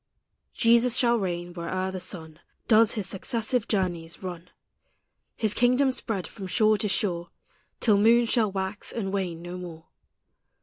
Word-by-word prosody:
Jesus 235 +1 +4
shall 235 -1 +3
reign 175 -2 -3
where'er 185 +2 -3
the 190 - -5
sun 160 -4 -6 0.3
Does 225 -1 +5
his 210 -3 -3
successive 225 +5 -2
journeys 175 -4 -2
run, 180 -1 -7 0.9
His 220 -3 -1
kingdom 250 +3 +3
spread 220 -7 -3
from 195 -3 -8
shore 215 +2 +3
to 210 - 0
shore, 175 -4 -1 0.5
Till 210 -4 +3
moons 230 +2 +4
shall 220 -5 +2
wax 190 +1 -4
and 200 -4 -3
wane 175 -4 -3
no 175 +1 -6
more. 165 -3 -9
195 Hz, 145 wpm, -26 LUFS, 180-225 Hz, 0.9 s, Does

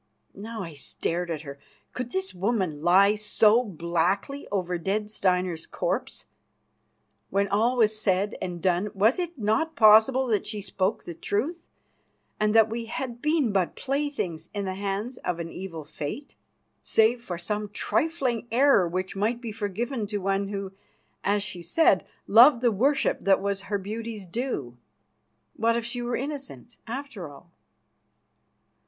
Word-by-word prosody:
Now 215 +1 -6
I 165 -3 -7
stared 170 +5 -2
at 160 -3 -3
her. 140 -2 -9 0.3
Could 250 -1 -4
this 190 -3 -2
woman 185 -5 -1
lie 190 +5 +5
so 215 +2 +3
blackly 180 - -1
over 180 -3 -1
dead 210 +4 -2
Steinar's 180 -4 0
corpse? - - -3 1.0
When 200 +1 +1
all 225 +6 +2
was 215 -2 +2
said 200 0 +1
and 175 -2 -5
done, 185 +2 +2
was 220 - +3
it 350 -2 -3
not 225 +9 0
possible 220 +4 +6
that 220 -5 0
she 210 -1 -4
spoke 190 +1 -1
the 170 - -7
truth, 235 - -3 0.7
and 210 0 +2
that 225 -1 +7
we 230 +1 -4
had 240 +1 -5
been 300 -6 +2
but 190 -3 0
playthings 270 - -3
in 200 -1 -2
the 190 - -2
hands 200 +5 -3
of 175 -1 -3
an 165 0 -5
evil 175 -4 -7
Fate? 155 - -7 0.5
Save 230 +2 +2
for 180 -7 -5
some 210 +4 -3
trifling 255 - -1
error, 245 -7 +5
which 185 +3 -3
might 220 +5 0
be 235 -2 -6
forgiven 215 +3 -3
to 205 0 -2
one 195 0 0
who, 195 -1 -4 0.5
as 205 0 +1
she 190 -4 -6
said, 190 - +3 0.2
loved 240 +4 +7
the 240 - +4
worship 265 +7 +2
that 195 -1 +4
was 200 0 -2
her 205 - +1
beauty's 215 +1 -6
due, 175 - -4 0.8
what 230 +1 +2
if 235 -1 -2
she 240 +1 -3
were 240 0 -2
innocent, 275 -3 -6
after 230 - -6
all? 145 +5 -15
210 Hz, 155 wpm, -26 LUFS, 185-235 Hz, 1.0 s, that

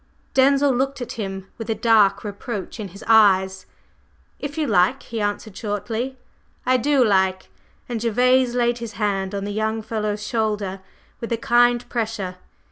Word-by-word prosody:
Denzil 275 +1 +4
looked 270 +2 -1
at 245 -1 -5
him 195 -3 -5
with 225 0 -6
a 225 - +1
dark 205 -3 +3
reproach 205 0 -6
in 210 - -4
his 195 +2 -12
eyes. 190 -4 +4 0.7
"If 290 +2 -6
you 310 - +1
like," 205 +3 +2
he 225 -1 -5
answered 205 0 -3
shortly. 225 +5 -3 0.5
"I 255 0 +4
do 270 0 +3
like!" 190 -2 +1 0.4
and 235 -3 -3
Gervase 250 +2 +3
laid 240 0 +1
his 230 -2 -6
hand 200 -1 -1
on 200 - -3
the 205 0 -4
young 220 +1 -1
fellow's 210 -1 -3
shoulder 210 -4 -2 0.4
with 230 - -6
a 230 - +1
kind 240 +1 +3
pressure. 215 -6 -3
220 Hz, 160 wpm, -22 LUFS, 200-240 Hz, 0.7 s, Denzil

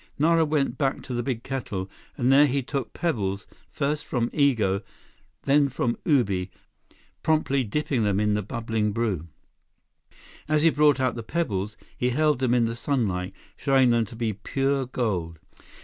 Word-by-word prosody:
Nara 165 +2 +4
went 150 -2 0
back 135 -2 0
to 130 - -6
the 120 - -1
big 120 -2 -3
kettle, 110 -8 -4 0.3
and 125 +2 +3
there 145 +2 +7
he 140 0 0
took 135 0 -3
pebbles 105 - -2 0.2
first 145 +1 -1
from 120 -2 -1
Igo, 110 -10 +2 0.6
then 140 0 +3
from 120 -2 -1
Ubi, 100 - +2 0.7
promptly 150 -4 +1
dipping 125 +1 -1
them 100 -1 +1
in 105 0 +2
the 105 - 0
bubbling 110 0 -2
brew. 100 -8 -1 1.2
As 155 0 +2
he 165 - +6
brought 145 -2 +4
out 130 -2 +1
the 115 - -5
pebbles, 105 - -2 0.2
he 125 - 0
held 150 +1 +2
them 125 -2 +2
in 120 -1 +3
the 115 0 -2
sunlight, 100 -9 -1 0.2
showing 135 -3 +3
them 115 -1 +2
to 110 - -12
be 115 -2 -1
pure 135 +5 -1
gold. 95 -10 -2
125 Hz, 165 wpm, -25 LUFS, 105-140 Hz, 1.2 s, there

